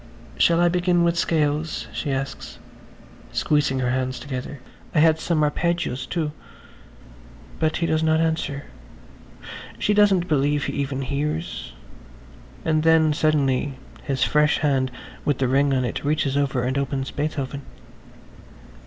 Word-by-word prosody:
"Shall 170 0 +4
I 175 - +5
begin 175 0 +2
with 170 0 +2
scales?" 155 -1 0
she 150 - -3
asks, 135 0 -4 0.7
squeezing 150 -3 +1
her 125 -1 +1
hands 130 -1 -1
together. 130 +2 -6 0.4
"I - - +5
had 160 0 +5
some 165 -2 +1
arpeggios, 150 -4 -1
too." 160 -4 -2 1.3
But 155 0 +1
he 170 - 0
does 160 -1 +1
not 160 0 +3
answer. 160 -3 -1 1.1
She 210 - +1
doesn't 200 -4 +4
believe 145 -2 +1
he - - -3
even 135 -1 -2
hears... 140 - -3 0.9
and 155 -1 +2
then 160 -1 +4
suddenly 145 -3 +1 0.3
his 135 -3 -1
fresh 150 0 +3
hand 135 -3 +1 0.3
with 145 -3 +1
the 130 - +1
ring 140 +2 +3
on 130 -2 +1
it 120 - -4
reaches 145 -2 0
over 135 -3 0
and 130 +2 0
opens 135 -1 -2
Beethoven. 140 -2 -3
145 Hz, 135 wpm, -23 LUFS, 135-160 Hz, 1.3 s, I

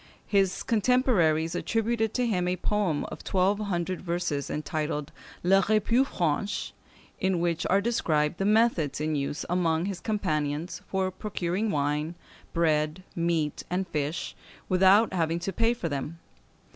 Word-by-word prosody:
His 195 -3 +1
contemporaries 205 -9 +2
attributed 225 +3 0
to 250 - +2
him 180 -6 0
a 180 - +1
poem 185 -4 0
of - - -8
twelve 195 +2 +1
hundred 185 -3 -2
verses, 170 -5 -2
entitled 150 -1 -3 0.3
"Les 195 +2 +5
Repues 230 +5 +3
Franches," 175 - -1 0.5
in 190 -2 +1
which 170 0 0
are 195 +2 +3
described 165 -8 0
the 195 - 0
methods 210 -10 +2
in 155 0 -1
use 145 +2 -2
among 170 -2 +1
his 195 -2 -3
companions 165 -5 -2
for 190 -1 -1
procuring 190 +1 -2
wine, 150 +1 -1 0.4
bread, 155 +1 +1
meat, 165 -3 0
and 185 +2 -1
fish, 150 +1 -3 0.3
without 190 +4 +5
having 165 -2 +1
to 175 +3 -4
pay 230 0 +2
for 235 -8 -3
them. 145 +2 -4
180 Hz, 140 wpm, -27 LUFS, 155-200 Hz, 0.5 s, Les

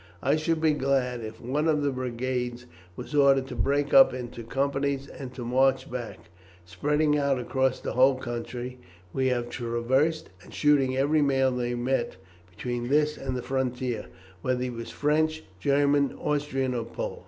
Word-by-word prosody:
I - - +3
should 160 +1 0
be 155 -1 +3
glad 130 -4 0
if 110 +1 -8
one 145 +6 -1
of 150 -2 +2
the 140 - +1
brigades 125 -1 -3 0.3
was - - -8
ordered 140 -2 +4
to 125 - -6
break 140 +6 0
up 270 - +7
into 120 -2 -6
companies 140 +2 -1
and 135 -3 -8
to 120 - -6
march 130 +2 +2
back, 120 -8 -7 0.3
spreading 150 - +1
out 140 -2 +1
across 130 +2 0
the - - -4
whole 130 +1 +5
country 125 0 -5 0.3
we 130 -1 +1
have 120 -2 0
traversed, 130 +7 0
and - - -15
shooting 135 -3 +3
every 150 +3 +3
man 135 -2 +2
they 120 0 -1
met 125 +2 -1 0.3
between 120 +5 -4
this 150 +2 +2
and 130 -1 -4
the 125 - -5
frontier, 125 -3 -2 0.3
whether 125 -1 0
he 125 - -2
was 115 -1 -7
French, 155 +2 0 0.2
German, 140 +3 +2
Austrian, 140 -3 -1
or 120 -2 -2
Pole." 115 - -5
130 Hz, 165 wpm, -27 LUFS, 125-145 Hz, 0.3 s, up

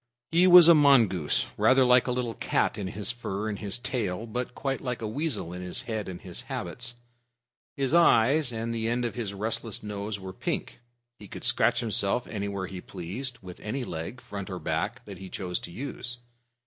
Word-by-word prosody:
He 175 +3 +5
was 175 -2 +10
a 170 - +10
mongoose, 115 - +4
rather 130 0 +5
like 125 0 +5
a - - +1
little 125 -2 -1
cat - - 0
in 100 - -4
his 105 +4 -2
fur 110 -3 -4
and 105 -2 -3
his 100 0 -2
tail, 115 -5 -2
but 125 +2 -4
quite 135 -1 -2
like 125 -2 -3
a 110 - -3
weasel 130 - -2
in 90 - -6
his 90 -1 -3
head 110 -4 -3
and 90 -2 -6
his 90 -2 -6
habits. 115 +7 -5 0.8
His 135 +1 0
eyes 145 -4 +5
and 115 0 -3
the 115 -1 -1
end 120 +1 0
of 120 - -2
his 110 -5 -4
restless 110 +1 -3
nose 105 0 -4
were 95 -1 -7
pink. - - -3 0.4
He 105 - -11
could - - -9
scratch 120 - +2
himself 110 0 0
anywhere 100 -2 -3
he 95 -1 -7
pleased 110 +9 -5
with 90 -1 -10
any 125 +5 -3
leg, 90 +6 -5
front 100 0 -7
or 90 - -4
back, 105 +10 -2
that 100 -3 -9
he 95 -1 -8
chose 90 -1 -3
to 85 - -9
use. 120 +1 -6
110 Hz, 200 wpm, -28 LUFS, 95-125 Hz, 0.8 s, was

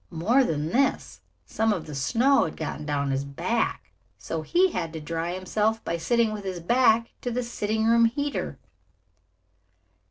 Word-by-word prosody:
More 220 +11 +2
than 155 - -1
this, 270 +9 0 0.2
some 225 0 0
of 185 -6 -2
the 150 - -8
snow 235 - +3
had 160 - -6
gotten 155 -1 -5
down 140 -1 0
his 135 +1 -1
back, 140 0 -2 0.3
so 165 - -4
he 360 - +2
had 165 - -3
to 160 - -5
dry 165 +3 -3
himself 215 +4 -1
by 170 - -1
sitting 225 +6 +1
with 210 -1 -6
his 185 -2 -4
back 230 +4 +3
to 245 - -3
the 245 +1 -2
sitting 220 -2 -2
room 230 0 +5
heater. 285 +5 -2
210 Hz, 165 wpm, -26 LUFS, 160-235 Hz, 0.3 s, room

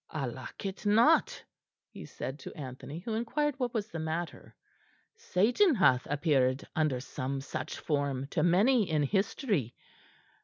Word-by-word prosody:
"I 150 -3 -3
like 130 +8 -7
it 195 0 -5
not," 235 - +4 0.5
he - - -9
said 135 +3 -6
to - - -9
Anthony, 140 +3 -7
who 220 +4 -4
inquired 280 +6 -1
what 250 -2 0
was 220 -2 -3
the 165 - -5
matter. 160 +2 -4 0.6
"Satan 255 - +3
hath 130 - +3
appeared 140 -3 +1
under 155 -6 +1
some 135 +1 -4
such 135 - -5
form 140 -3 -1
to - - 0
many 200 +6 +4
in 155 -2 +2
history. 195 - 0
165 Hz, 145 wpm, -30 LUFS, 140-225 Hz, 0.6 s, not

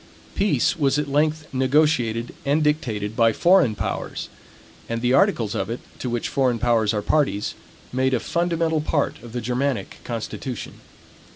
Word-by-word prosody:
Peace 200 -1 +2
was 140 -1 +2
at 150 -1 -1
length 155 +2 +1
negotiated, 130 -4 +2
and 145 +3 +2
dictated 110 -9 -1
by 115 -1 +4
foreign 170 - +4
powers; - - -4 0.6
and 115 0 -1
the 125 +2 +1
articles 130 - +3
of 95 - -2
it, 115 - -3 0.2
to 125 - -3
which 120 -1 -1
foreign 130 -3 +1
powers 115 -2 +2
are 105 -2 -2
parties, 135 -7 +1 0.4
made 130 0 +2
a - - 0
fundamental 165 +1 0
part 150 -4 -1
of 120 -1 -11
the 120 +1 -3
Germanic 125 +3 -2
constitution. 120 +1 -5
130 Hz, 155 wpm, -23 LUFS, 115-150 Hz, 0.6 s, by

